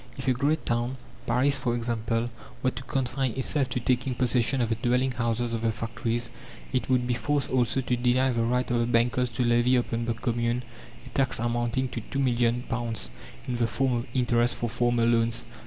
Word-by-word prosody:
If 130 - -6
a 130 - +4
great 145 +5 0
town, 120 +2 -1 0.3
Paris 130 +4 +3
for 120 -1 0
example, 115 0 -1 0.3
were 130 - +3
to - - -7
confine 130 -1 -1
itself 135 +1 +1
to 125 - -1
taking 125 +1 0
possession 125 +1 +2
of 120 -2 +1
the - - +2
dwelling 125 +3 +1
houses 120 -1 -1
of 115 - -2
the 115 -1 +1
factories, 115 +1 -2 0.4
it 125 -3 -1
would 125 -1 +2
be 125 - 0
forced 140 +4 0
also 130 +1 +2
to 125 -1 0
deny 125 +2 +2
the 115 -1 0
right 125 +2 0
of 120 - +2
the 115 - +1
bankers 120 +1 +2
to 125 - 0
levy 120 +2 +3
upon 120 -1 0
the 115 -1 -1
Commune 120 +1 -1 0.4
a - - -10
tax 130 +1 0
amounting 120 +2 0
to 120 - -5
£2,000,000, 120 - -1 0.4
in 125 -1 -1
the 120 -1 +2
form 130 +3 +1
of 120 0 -2
interest 120 -1 +2
for 120 - -2
former 120 0 +1
loans. 115 0 +1
120 Hz, 195 wpm, -27 LUFS, 115-130 Hz, 0.4 s, a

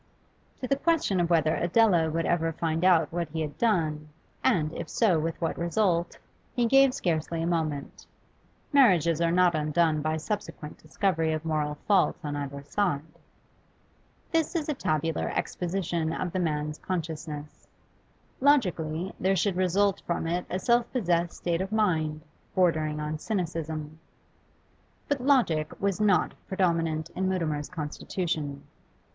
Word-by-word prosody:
To 255 - -2
the 275 - +1
question 300 - +1
of 170 -1 +1
whether 160 -2 +3
Adela 175 -3 +3
would 165 +1 -1
ever 165 -1 +1
find 165 +1 -1
out 170 -5 +4
what 170 -2 -2
he 160 +1 -3
had 150 -2 -4
done, 155 -9 +1 0.3
and, 155 -2 +2
if - - -6
so, 190 -9 +3
with 165 +1 -3
what 165 - -2
result, 170 -1 0 0.4
he 240 -2 +2
gave 270 +2 +5
scarcely 165 -1 -1
a 165 - -1
moment. 155 -4 -2 0.7
Marriages 170 - +4
are 165 0 +2
not 180 0 +4
undone 155 0 +1
by 155 +1 -1
subsequent 165 -4 -5
discovery 160 -1 0
of 155 +1 -4
moral 150 -2 -1
faults 195 -6 +2
on 145 0 -3
either 140 -1 -5
side. 145 -2 0 1.3
This 325 +1 0
is 315 -3 -1
a 305 - 0
tabular 160 - -1
exposition 175 -3 -2
of 180 +1 -3
the 185 - -2
man's 150 -2 -2
consciousness. 155 -4 -5 0.7
Logically, 180 - +1
there 190 +1 +2
should 190 +1 +1
result 185 +2 +2
from 170 -1 -1
it 175 +2 -2
a 185 - -1
self 235 +4 +2
possessed 175 -8 0
state 170 0 -1
of 190 +1 -4
mind, 160 -8 +1 0.3
bordering 155 -5 +2
on 150 0 -3
cynicism. 160 -5 -3 1.1
But 285 -2 -1
logic 230 - +2
was 200 0 0
not 200 -4 +3
predominant 165 -4 0
in 190 0 -1
Mutimer's 155 -6 -1
constitution. 155 -2 -4
170 Hz, 145 wpm, -27 LUFS, 155-190 Hz, 1.3 s, gave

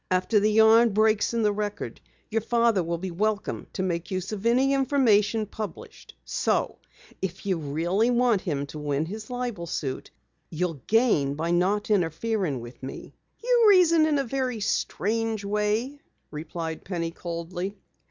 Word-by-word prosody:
After 185 +4 +2
the 210 +1 +2
yarn 220 +1 +6
breaks 215 0 +3
in 230 -1 0
the 210 - +3
Record, 205 0 -4 0.3
your 225 +1 +1
father 230 -2 +2
will 170 0 -2
be 185 +2 -5
welcome 210 +4 -2
to 190 - -2
make 170 -2 -2
use 185 +1 -3
of 215 +1 -2
any 260 +4 +3
information 235 -6 +2
published. 210 -3 -8
So - - -1 0.4
if 190 0 -4
you 190 -4 0
really 170 +10 0
want 240 -4 +3
him 145 -4 -2
to 150 +2 -9
win 145 0 -1
his 215 +7 -7
libel 245 -8 -4
suit, 135 -5 -4 0.4
you'll 165 -3 -3
gain 210 - +3
by 165 +3 -2
not 195 +5 +1
interfering 180 - 0
with 120 +1 -11
me." 130 - -8 0.3
"You 485 -1 +4
reason 335 -5 +5
in 300 -2 +2
a 275 - +1
very 255 -2 -2
strange 220 +1 -1
way," 210 +7 -1 0.3
replied 160 +1 -5
Penny 170 -3 -3
coldly. 175 +4 -5
205 Hz, 155 wpm, -26 LUFS, 170-230 Hz, 0.4 s, yarn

